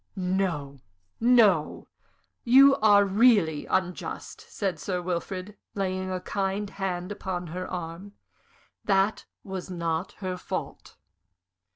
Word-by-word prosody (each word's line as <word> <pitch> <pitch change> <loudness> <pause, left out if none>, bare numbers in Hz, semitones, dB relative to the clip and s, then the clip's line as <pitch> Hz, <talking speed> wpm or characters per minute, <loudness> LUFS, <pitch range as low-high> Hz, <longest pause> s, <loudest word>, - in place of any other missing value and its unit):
"No, 180 -7 -2 0.4
no! 225 -9 +3 0.6
You 270 +3 +7
are 205 -2 +5
really 200 -7 +3
unjust," 180 -1 -3
said 190 -6 -3
Sir 180 +4 -2
Wilfrid, 185 +3 -4 0.2
laying 185 -1 -2
a 185 -1 -2
kind 195 +2 -2
hand 185 -1 -3
upon 190 -3 -4
her 185 +1 -4
arm. 180 +3 -6 0.7
"That 195 +1 +1 0.2
was 190 -2 -6
not 170 -1 -2
her 185 -2 -5
fault." - - -6
190 Hz, 105 wpm, -27 LUFS, 180-200 Hz, 0.7 s, You